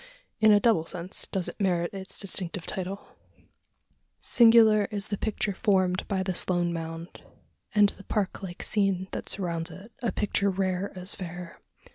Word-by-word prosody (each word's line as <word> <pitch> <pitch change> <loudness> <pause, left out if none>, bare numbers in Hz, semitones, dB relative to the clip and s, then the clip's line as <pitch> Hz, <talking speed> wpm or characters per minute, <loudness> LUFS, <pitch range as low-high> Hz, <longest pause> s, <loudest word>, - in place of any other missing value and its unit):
In 220 -1 +6
a 205 - +7
double 205 -7 +2
sense, 180 +3 -4
does 190 -3 -2
it - - -7
merit 175 -2 +1
its 190 -1 -6
distinctive 185 -3 -1
title. 190 +1 -5 1.1
Singular 225 -3 +6
is 205 0 -4
the 205 - -1
picture 215 -1 -1
formed 185 -3 +1
by 190 -2 0
this 185 -1 -1
lone 175 -1 +1
mound, 165 +1 -6 0.5
and 205 -1 +6
the 195 - -11
park 205 -4 -2
like 180 -3 -7
scene 195 -3 +1
that - - -5
surrounds 170 -4 -2
it 205 +5 -12
a 235 - 0
picture 200 -1 0
rare 190 0 -1
as 185 +2 0
fair. 180 -2 -8
190 Hz, 160 wpm, -27 LUFS, 180-205 Hz, 1.1 s, a